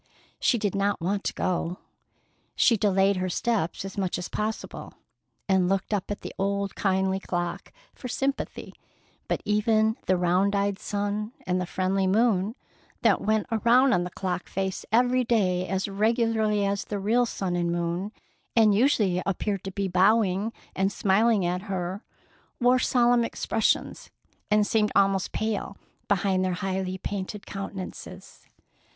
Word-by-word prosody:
She 245 - +3
did 205 -3 -1
not 200 0 0
want 195 +4 -1
to - - -1
go. 180 -1 -1 0.8
She 235 - +4
delayed 195 -1 +2
her 185 0 -1
steps 195 -2 -1
as 195 +1 -6
much 185 -2 -1
as 180 - -5
possible, 215 +1 -4 0.5
and 190 -2 +3
looked 195 +2 -1
up 200 -3 -2
at 205 - -4
the - - -7 0.4
kindly 190 -1 +1
old - - -19
clock 175 -1 -3 0.2
for 255 - -8
sympathy; 270 +3 -3 0.5
but - - -2
even 220 +1 +2
the 185 - +3
round 180 +3 +2
eyed 200 0 0
sun 205 +2 -3
and 185 0 0
the 180 - -3
friendly 190 +1 0
moon 210 0 +2 0.5
that - - +4
went 215 0 +1
around 240 +4 +4
on 175 - +2
the 180 - -4
clock 180 0 -4
face 190 0 -3
every 250 +2 +3
day 185 -6 +1
as 190 +1 -1
regularly 215 0 +1
as 200 0 -1
the 205 - -4
real 230 +5 +2
sun 185 -5 -3
and 175 -1 0
moon, 175 +4 -2 0.4
and 220 -3 +5
usually 205 -6 +2
appeared 195 0 -1
to 195 - -4
be 195 +1 -2
bowing 195 +2 +2 0.2
and 195 +1 +1
smiling 205 +1 +2
at 180 +1 -1
her, 185 +2 -3 0.6
wore 250 +1 +4
solemn 245 -1 +3
expressions, 225 -1 -1 0.4
and 210 -1 +4
seemed 210 -1 +1
almost 195 -1 +2
pale 215 -2 -3 0.3
behind 195 -1 +1
their 185 -1 0
highly 190 0 -2
painted 200 +2 -5
countenances. 195 -1 -8
200 Hz, 150 wpm, -26 LUFS, 185-220 Hz, 0.8 s, and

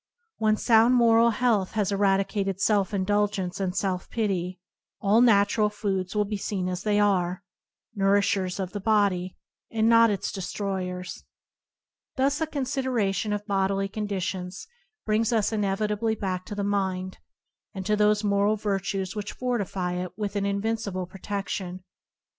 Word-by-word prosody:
When 215 -1 +2
sound 230 +2 +5
moral 230 -1 +5
health 230 -6 +1
has 210 -3 0
eradicated 195 -1 +1
self 200 -2 +2
indulgence 200 -1 0
and 190 -1 -2
self 185 -2 -1
pity, 185 -5 -2 0.4
all 210 +3 +4
natural 210 -2 +4
foods 195 -2 -3
will 210 0 +2
be 210 0 -3
seen 190 -2 -3
as 180 -1 -3
they 210 -1 +1
are 185 -3 +1 0.3
— - - -49
nourishers 195 -1 +1
of 185 -1 -3
the 205 - -4
body, 200 -3 +1 0.3
and 225 -1 +1
not 230 0 +6
its 200 -2 -2
de 195 - -5
stroyers. 180 -2 -4 0.9
Thus 275 +3 +1
a 320 - +1
consideration 255 -8 -1
of 205 0 -2
bodily 195 -1 0
conditions 190 -3 -4 0.4
brings 220 +2 +1
us 225 -3 +1
inevitably 210 +2 0
back 185 -3 -3
to 205 - -5
the 205 - -2
mind, 190 -2 -2 0.6
and 190 -1 -5
to 210 - +2
those 210 0 +3
moral 200 +1 +2
virtues 195 -2 -2
which 205 -1 -4
fortify 200 -8 -2
it 180 0 -5
with 205 -1 -3
an 200 0 0
invincible 200 -2 -2
protection. 185 -1 -5
200 Hz, 145 wpm, -26 LUFS, 190-215 Hz, 0.9 s, not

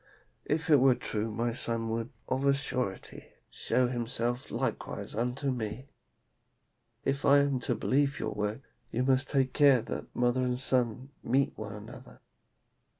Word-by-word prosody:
If 160 +3 -1
it 145 - +8
were 130 -1 +5
true 110 -1 -3
my 115 +2 -1
son 115 -1 0
would, 115 +1 -2 0.2
of 130 +1 -1
a 140 - +5
surety, 130 -8 -3 0.2
show 125 -1 +1
himself 120 0 -2
likewise - - -3
unto 125 +5 -1
me. 120 +2 -4 1.2
If 140 +1 0
I 140 0 +6
am 140 -2 +2
to 120 - -1
believe 140 +5 +1
your - - -2
words, 105 +5 -3 0.3
you 120 +3 -1
must 130 +1 +2
take 135 -2 +1
care 140 -5 +5
that - - -6
mother 125 +1 +2
and 125 -1 0
son 130 0 0
meet 135 +4 +1
one - - -6
another.' - - -11
125 Hz, 150 wpm, -30 LUFS, 115-135 Hz, 1.2 s, it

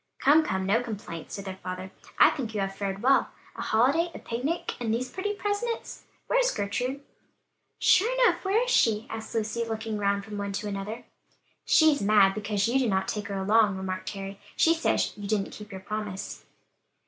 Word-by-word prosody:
"Come, 295 +4 +5
come, 190 -9 -1
no 215 +5 +3
complaints," 205 -8 -6
said 200 - -7
their 190 -1 -6
father; 185 +1 -6 0.3
"I - - +7
think 235 -7 -5
you 205 - 0
have 195 0 -3
fared 195 +1 -4
well; 270 +2 +4 0.3
a - - -6
holiday, 275 +10 +2
a - - -4
picnic, 265 +9 -3
and 235 -3 -1
these 250 +3 -1
pretty 410 +2 -2
presents. 415 +3 -3 0.2
Where's - - +3
Gertrude?" 250 - -2 0.8
"Sure 435 +6 +4
enough, - - +2
where 405 +5 +2
is - - -2
she?" 225 - +3
asked 225 0 -6
Lucy, 225 +1 -1
looking 220 -1 -3
round 200 0 0
from 210 -2 -6
one 200 0 -3
to 210 +2 -3
another. 205 +3 -5 0.6
"She's 315 -2 +5
mad 200 -1 +5
because 205 0 -1
you 255 +3 +2
did 250 -4 +1
not 190 -1 0
take 210 -1 -3
her 200 - -4
along," 205 0 +3
remarked 185 0 -4
Harry, 195 0 -7 0.2
"she 330 - +5
says 330 - 0
you 205 -1 -7
didn't 205 -2 0
keep 210 -1 -10
your 190 -1 -7
promise." 210 -1 -5
215 Hz, 190 wpm, -27 LUFS, 200-260 Hz, 0.8 s, I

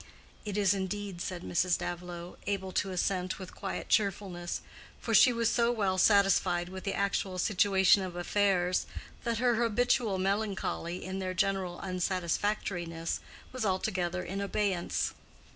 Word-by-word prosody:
"It 205 -1 -3
is 200 -1 +4
indeed," 195 -1 -4
said 180 -1 -4
Mrs. 175 0 +1
Davilow, 175 0 -6
able 195 -2 -2
to 195 - 0
assent 185 0 -1
with 185 -2 -9
quiet 195 - -5
cheerfulness, 195 -4 0 0.4
for 230 - -3
she 235 +4 +8
was 230 -1 +1
so 235 +1 +3
well 195 -5 0
satisfied 190 -3 +4
with 190 0 -8
the 195 - -1
actual 195 -1 -1
situation 195 0 +4
of 185 -2 -5
affairs 180 0 +1 0.4
that 235 -1 0
her 240 0 +2
habitual 230 -2 +2
melancholy 195 -3 -2
in 190 +1 -4
their 185 -1 -3
general 185 -2 0
unsatisfactoriness 180 -2 -1 0.3
was 255 -2 -4
altogether 185 -2 -1
in 195 +2 -4
abeyance. 200 -3 -1
190 Hz, 140 wpm, -30 LUFS, 180-205 Hz, 0.4 s, she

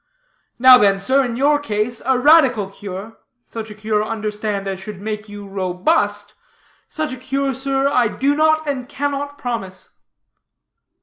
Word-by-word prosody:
Now 255 0 +8
then, 200 -2 +4
sir, 260 +8 +2
in 240 -2 -3
your 290 +3 +3
case, 225 -2 -2
a 265 -1 +3
radical 255 -8 +4
cure 200 +2 -8 0.3
such 225 -1 -7
a 210 - -10
cure, 215 0 -1
understand, 210 -2 -3
as 190 -1 -4
should 200 0 -8
make 210 +1 -5
you 205 -1 -9
robust 200 +2 -1 0.6
such 310 -5 -3
a - - -7
cure, 270 +2 -2
sir, 270 +1 0
I 250 -5 +2
do 275 +6 0
not 315 0 +2
and 265 -2 -3
cannot 285 0 -3
promise." 225 -8 -5
230 Hz, 150 wpm, -19 LUFS, 205-275 Hz, 0.6 s, Now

